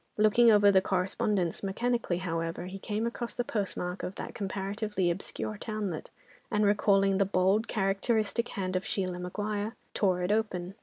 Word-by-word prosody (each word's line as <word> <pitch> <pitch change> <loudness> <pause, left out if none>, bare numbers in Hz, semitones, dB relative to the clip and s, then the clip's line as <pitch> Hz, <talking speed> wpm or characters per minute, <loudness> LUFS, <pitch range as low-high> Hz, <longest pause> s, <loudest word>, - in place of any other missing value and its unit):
Looking 215 +3 +5
over 205 -2 +6
the 190 -1 +5
correspondence, 185 -1 0
mechanically, 220 -1 0
however, 165 -1 -3
he 190 +2 -7
came 215 +3 -2
across 235 0 -4
the 245 - 0
postmark 195 -5 -3
of 185 - -5
that - - -6
comparatively 195 -1 -1
obscure 200 +3 -5
townlet, 210 -8 -4 0.4
and 210 -2 +2
recalling 195 -1 +3
the - - +6
bold, 195 +3 +2
characteristic 215 +3 0
hand 185 -2 -3
of 185 - 0
Sheila 185 -2 -2
Maguire, 205 +4 -3 0.2
tore 185 -3 +1
it 180 - 0
open. 195 -4 -1
195 Hz, 155 wpm, -30 LUFS, 185-215 Hz, 0.4 s, over